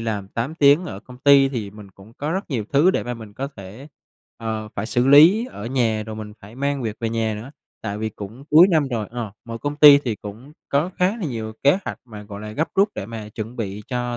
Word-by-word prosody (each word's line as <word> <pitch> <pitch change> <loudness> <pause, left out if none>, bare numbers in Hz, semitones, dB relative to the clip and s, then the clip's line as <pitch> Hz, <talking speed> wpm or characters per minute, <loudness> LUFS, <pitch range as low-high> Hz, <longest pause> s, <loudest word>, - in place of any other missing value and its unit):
làm 105 -4 -3
8 120 +9 -4
tiếng 145 +2 +5
ở 100 - -7
công 125 +2 -14
ty 140 0 +6
thì 115 -7 -4
mình 105 -1 -13
cũng 95 +3 -17
có 145 +4 -4
rất 190 -2 -4
nhiều 120 -6 -2
thứ 150 +6 +5
để - - -1
mà 120 0 -4
mình 110 -3 -11
có 135 +4 -4
thể, 105 +9 -11 0.5
ờ, 110 -1 -4
phải 100 - -2
xử 120 +2 +1
lý 170 - +7
ở 105 - -8
nhà 115 -4 0
rồi 110 -1 -6
mình 105 -1 -7
phải 105 +2 -13
mang 140 +1 -2
việc 110 -2 -3
về 115 - -1
nhà 115 -1 -1
nữa, 110 +5 -8 0.3
tại 105 -2 -4
vì 110 0 -2
cũng 110 +5 -10
cuối 165 +5 +8
năm 155 -6 +2
rồi, 115 -5 -3
ờ, 115 -4 -5
mọi 115 -1 -7
công 145 +4 -4
ty 145 -1 +9
thì 120 -6 -3
cũng 110 +8 -10 0.2
có 150 +6 +1
khá 185 +4 +2
là 220 - -5
nhiều 115 -6 -4
kế 145 +7 +4
hoạch - - -5
mà, 110 -4 -10
gọi 100 -1 -9
là, 105 0 -7
gấp 155 +8 -1
rút 200 +2 +4
để 95 - -5
mà 110 -1 -7
chuẩn 110 +3 -7
bị 105 -2 -5
cho 125 -1 -2
115 Hz, 255 wpm, -22 LUFS, 110-140 Hz, 0.5 s, ty